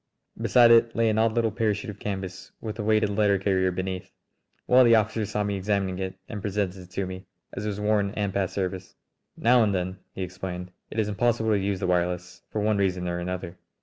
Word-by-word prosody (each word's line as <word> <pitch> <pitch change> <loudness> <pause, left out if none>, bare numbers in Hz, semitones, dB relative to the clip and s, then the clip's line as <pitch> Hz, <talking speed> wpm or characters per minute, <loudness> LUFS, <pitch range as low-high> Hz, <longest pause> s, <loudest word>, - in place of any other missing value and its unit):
Beside 120 -1 +6
it 115 0 +5
lay 115 -1 +3
an 110 - +1
odd 110 0 +3
little 115 -1 +1
parachute 105 -1 -1
of 105 - -14
canvas 95 -2 -5
with 110 0 -6
a - - -1
weighted 110 -1 +2
letter 100 -1 +3
carrier 95 -1 +1
beneath. 95 0 -4 0.5
One 125 - +5
of 125 - +7
the 115 - +7
officers 110 -1 +1
saw 105 - -1
me 100 0 -1
examining 95 -1 -1
it 95 -1 -3
and 105 -3 -6
presented 100 -2 -1
it 90 - -14
to 95 +1 -2
me, 95 +1 -8 0.3
as 100 - -4
it - - -1
was 105 -1 -3
worn 105 -1 +2
and 100 -2 -1
past 95 -2 -1
service. 95 -1 -3 0.4
"Now 120 +2 +5
and 105 -3 +2
then," 95 +1 -3 0.2
he 95 - -3
explained, 90 0 -6 0.2
"it - - -8
is 110 -2 +2
impossible 110 +1 +1
to 105 - +3
use 100 -1 -1
the - - -2
wireless, 90 0 -1
for 105 - -2
one 105 0 +2
reason 90 -2 0
or 85 0 -2
another. 90 0 -5
100 Hz, 225 wpm, -26 LUFS, 95-110 Hz, 0.5 s, of